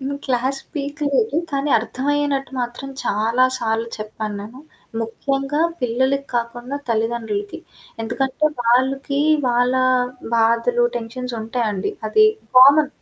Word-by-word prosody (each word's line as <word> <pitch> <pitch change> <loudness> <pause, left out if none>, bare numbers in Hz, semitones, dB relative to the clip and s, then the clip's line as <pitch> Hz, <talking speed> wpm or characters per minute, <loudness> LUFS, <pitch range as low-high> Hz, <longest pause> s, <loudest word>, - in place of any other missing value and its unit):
నేను 275 +1 -3
క్లాస్ 260 +1 0 0.2
పీక 285 +1 -4 0.2
లేదు. 435 +2 +1
కానీ 280 0 -1
అర్థమయ్యనట్టు 275 +3 -1
మాత్రం 245 +3 -4 0.2
చాలా 225 +5 +2
సార్లు 225 0 -1
చెప్పాను 215 0 -5
నేను. 220 +5 -10 0.4
ముఖ్యంగా 275 +6 -2 0.2
పిల్లలకి 260 +3 0
కాకుండా 240 +3 -3
తల్లిదండ్రులకి. 220 -2 -2 0.4
ఎందుకంటే 265 +6 0
వాళ్ళకి 265 +4 +1 0.3
వాళ్ళ 245 +1 +2 0.6
బాధలు, 230 +1 +3
టెన్షన్స్ 240 +1 -5
ఉంటాయండి. 220 -4 -2 0.2
అది 430 - +5 0.3
కామన్ 285 +3 +8
245 Hz, 105 wpm, -21 LUFS, 230-275 Hz, 0.6 s, కామన్